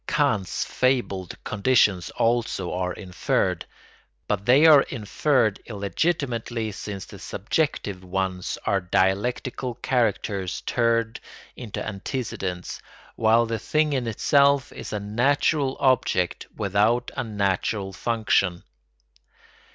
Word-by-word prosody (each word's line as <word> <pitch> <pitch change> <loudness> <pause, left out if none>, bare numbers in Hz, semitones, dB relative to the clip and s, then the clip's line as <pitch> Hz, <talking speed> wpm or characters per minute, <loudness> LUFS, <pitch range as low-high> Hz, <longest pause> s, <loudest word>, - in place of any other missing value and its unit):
Kant's 110 - 0
fabled 120 -9 -1
conditions 100 -5 +2
also 115 -6 0
are 90 0 -1
inferred; 90 -3 -1 0.6
but 100 -1 -2
they 135 +6 +6
are 150 -3 +9
inferred 115 -1 0
illegitimately 115 - -2
since 100 -1 -6
the - - -12
"subjective" 100 - -2
ones 95 0 -2
are 100 -1 +1
dialectical 115 +7 0
characters 110 -7 -1
turned 115 -1 0 0.4
into 115 -5 -6
antecedents, 100 -4 -4 0.3
while 115 +1 +4
the 115 -1 -3
thing 155 +5 +1
in 130 -3 -1
itself 140 +4 +3
is - - -8
a 105 - -2
natural 135 +6 +1
object 125 -10 +1
without 105 +5 +1
a 130 - -1
natural 100 -2 -1
function. 100 -5 0
110 Hz, 105 wpm, -24 LUFS, 95-130 Hz, 0.6 s, are